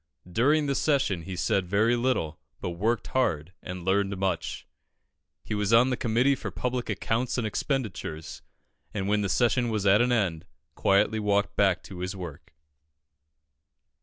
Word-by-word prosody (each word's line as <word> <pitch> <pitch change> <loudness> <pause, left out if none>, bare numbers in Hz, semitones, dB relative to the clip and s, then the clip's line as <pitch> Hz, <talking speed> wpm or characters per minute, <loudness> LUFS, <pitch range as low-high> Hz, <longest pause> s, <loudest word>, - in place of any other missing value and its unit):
During 140 - +2
the 140 - 0
session, 135 - +1
he 95 0 -5
said 90 +2 0
very 110 +6 +3
little, 120 -11 -1 0.2
but 90 - -3
worked 110 +6 0
hard 90 - 0
and 90 -1 -7
learned 100 +1 +1
much. 95 -2 -2 0.8
He - - -5
was 105 0 0
on 120 +3 +5
the - - +1
Committee 120 +4 +2
for 135 - -4
Public 125 -1 -3
Accounts 115 +4 -1
and 120 - 0
Expenditures, 105 - -3 0.5
and 100 -2 -1
when 105 +1 +2
the 100 - -1
session 120 +4 +2
was 105 -3 -1
at 100 +3 +5
an 125 +1 +2
end, 90 -7 0 0.3
quietly 100 +3 +2
walked 100 -1 +1
back 95 -3 +2
to 95 -3 -9
his 90 +2 -3
work. 85 -6 -8
105 Hz, 160 wpm, -27 LUFS, 95-120 Hz, 0.8 s, on